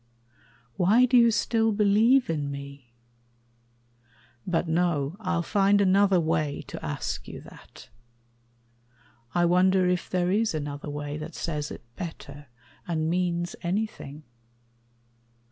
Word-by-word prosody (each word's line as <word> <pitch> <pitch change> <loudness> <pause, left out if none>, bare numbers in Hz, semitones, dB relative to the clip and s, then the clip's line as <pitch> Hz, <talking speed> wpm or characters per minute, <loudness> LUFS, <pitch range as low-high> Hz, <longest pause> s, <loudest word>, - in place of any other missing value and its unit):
Why 215 +8 +5
do 255 0 +1
you 235 -1 +7
still 225 0 +1
believe 220 +5 +4
in 150 -3 -2
me? 140 -3 -9 1.6
But 175 -1 0
no, 165 -3 0
I'll 185 -5 -1
find 200 +1 +3
another 195 -1 +4
way 155 -3 -1
to - - -8
ask - - -4
you - - -8
that. - - -15 1.5
I 175 - +3
wonder 185 +1 +3
if 180 -1 -1
there 180 -1 0
is 215 -2 +1
another 145 -1 -5
way 145 0 -5
That 155 +1 -8
says 150 -3 -3
it - - -9
better, 145 -4 -8 0.4
and 160 -1 -1
means 175 -1 -1
anything. 170 -6 -4
175 Hz, 120 wpm, -26 LUFS, 150-200 Hz, 1.6 s, you